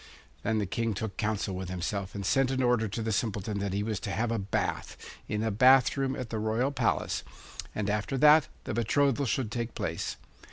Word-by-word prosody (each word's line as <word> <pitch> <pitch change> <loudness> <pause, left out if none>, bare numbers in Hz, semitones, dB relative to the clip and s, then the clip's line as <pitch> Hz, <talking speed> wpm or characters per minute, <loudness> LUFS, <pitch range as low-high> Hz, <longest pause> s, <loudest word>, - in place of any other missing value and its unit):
Then 110 - 0
the 105 - 0
King 115 +3 -1
took 105 -1 -4
counsel 105 -2 -1
with 90 -1 -5
himself 95 +2 -3
and 100 -1 -4
sent 135 +5 +3
an 130 -1 0
order 120 -3 +2
to 110 +3 -4
the 110 - -1
Simpleton 105 -1 -1
that 100 -1 -2
he 100 +2 -1
was 110 -3 -2
to 100 - -5
have 110 +5 -1
a 115 - 0
bath, 100 0 -2 0.3
in 105 +1 -1
a 110 - 0
bath 125 +4 +5
room 135 -1 0
at 125 -3 -6
the 110 - -2
royal 110 +5 0
palace, 125 -4 0 0.5
and 105 -2 -1
after 105 +6 -1
that 150 +2 +6 0.2
the - - -4
betrothal 140 +4 +2
should 115 0 -1
take 120 -1 -3
place. - - -3
110 Hz, 210 wpm, -29 LUFS, 100-125 Hz, 0.5 s, that